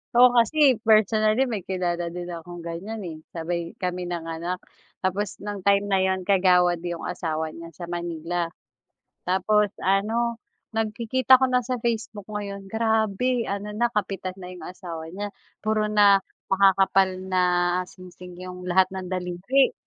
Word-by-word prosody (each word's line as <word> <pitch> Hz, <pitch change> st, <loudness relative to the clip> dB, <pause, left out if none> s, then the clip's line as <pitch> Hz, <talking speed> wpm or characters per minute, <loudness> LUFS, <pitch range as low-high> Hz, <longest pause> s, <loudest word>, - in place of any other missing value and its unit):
Ako 250 Hz, +1 st, +9 dB
kasi 245 Hz, +1 st, +4 dB
personally 215 Hz, +2 st, +4 dB
may 225 Hz, -5 st, -3 dB
kilala 175 Hz, -2 st, -2 dB
din 175 Hz, +1 st, -6 dB
akong 170 Hz, 0 st, -8 dB
ganyan, 200 Hz, +6 st, -5 dB
eh. 160 Hz, -2 st, -6 dB
Sabay 170 Hz, 0 st, -4 dB
kami 180 Hz, -1 st, -3 dB
nanganak 170 Hz, +1 st, -3 dB, 0.5 s
tapos 195 Hz, +2 st, -1 dB
nang 205 Hz, -1 st, -5 dB
time 200 Hz, 0 st, +4 dB
na 195 Hz, -1 st, +2 dB
yun 190 Hz, -1 st, 0 dB
kagawad 180 Hz, -3 st, +4 dB
yung 170 Hz, -1 st, -4 dB
asawa 160 Hz, -3 st, -3 dB
niya 165 Hz, 0 st, -9 dB
sa 175 Hz, -, -8 dB
Manila. 170 Hz, 0 st, -3 dB, 0.8 s
Tapos 200 Hz, +3 st, +2 dB
ano, 225 Hz, +5 st, +1 dB, 0.3 s
nagkikita 235 Hz, +4 st, +3 dB
ko 260 Hz, -, +3 dB
na 250 Hz, -2 st, +1 dB
sa 250 Hz, -2 st, -2 dB
Facebook 220 Hz, -3 st, -3 dB
ngayon 200 Hz, -2 st, -5 dB
grabe 220 Hz, +2 st, +1 dB
ano 205 Hz, +1 st, -4 dB
na, 240 Hz, +3 st, +1 dB
kapitan 195 Hz, -4 st, -3 dB
na 180 Hz, -, -9 dB
yung 180 Hz, -, -10 dB
asawa 170 Hz, -3 st, -7 dB
niya. 205 Hz, +3 st, -5 dB, 0.3 s
Puro 215 Hz, -1 st, +1 dB
na 205 Hz, -2 st, +6 dB, 0.2 s
makakapal 195 Hz, 0 st, +4 dB, 0.2 s
na 185 Hz, -1 st, +1 dB, 0.5 s
singsing 180 Hz, -1 st, -12 dB
yung 180 Hz, 0 st, -7 dB
lahat 185 Hz, +1 st, +5 dB
ng 185 Hz, -1 st, -5 dB
daliri. 185 Hz, +9 st, +1 dB
195 Hz, 145 wpm, -25 LUFS, 175-215 Hz, 0.8 s, Ako